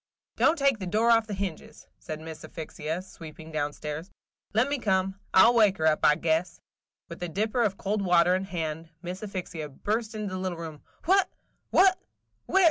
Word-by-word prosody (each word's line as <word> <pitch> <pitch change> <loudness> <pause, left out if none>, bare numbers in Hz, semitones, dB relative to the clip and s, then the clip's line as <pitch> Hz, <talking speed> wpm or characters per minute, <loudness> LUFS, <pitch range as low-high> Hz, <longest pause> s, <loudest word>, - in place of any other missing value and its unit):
"Don't 320 - +3
take 275 -5 +2
the 190 - -4
door 220 +5 +3
off 230 -1 +4
the 205 - -4
hinges," 190 -4 -6
said 155 -2 -6
Miss 160 0 -9
Asphyxia, 160 +2 -5
sweeping 160 -3 -11
down 150 -1 -1
stairs. 150 +4 -6 0.4
"Let 225 +5 +3
me 285 -1 -1
come; 190 -2 0
I 190 - +7
'll 240 - +5
wake 210 -5 +4
her, 160 -1 +3
I 150 - +6
guess!" 165 +2 0
and - - -24 0.5
with 170 - -9
a 175 - -3
dipper 215 +7 0
of 200 -4 +1
cold 205 +1 -1
water 175 -1 +4
in 190 +1 0
her - - -16
hand, 160 -2 -4
Miss 180 +2 -5
Asphyxia 180 -7 -5
burst 215 - -2
into 210 -3 -4
the 185 - -3
little 185 -2 -3
room. 160 -3 -7 0.2
"What! 380 +1 +4 0.2
– - - -46
what! 375 0 +5
185 Hz, 200 wpm, -27 LUFS, 160-215 Hz, 0.5 s, I